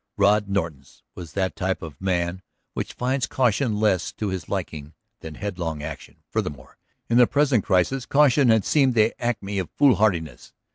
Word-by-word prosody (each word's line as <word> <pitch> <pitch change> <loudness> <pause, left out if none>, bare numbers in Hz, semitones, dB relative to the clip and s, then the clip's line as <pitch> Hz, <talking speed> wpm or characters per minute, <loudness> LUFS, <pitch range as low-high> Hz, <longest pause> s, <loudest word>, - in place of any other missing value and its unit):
Rod 100 0 +3
Norton's 80 -9 -4
was 85 -3 -10
that 95 -2 -1
type 95 0 -2
of 80 0 -10
man 90 -1 -1 0.3
which - - -4
finds 130 +1 -1
caution 120 -3 +1
less 105 -4 +1
to 105 - -3
his 95 -4 -5
liking 80 -5 -5 0.2
than 80 -1 -9
headlong 85 -7 -4
action; 75 -3 -9
furthermore, 65 -3 -5 0.3
in 115 - +2
the 120 - +7
present 140 -6 +2
crisis, 105 +7 +1
caution 140 -2 +4
had 110 -2 +3
seemed 135 -5 +3
the 110 0 +3
acme 105 -4 -2
of 90 - -4
foolhardiness. 100 - +2
100 Hz, 160 wpm, -24 LUFS, 85-120 Hz, 0.3 s, the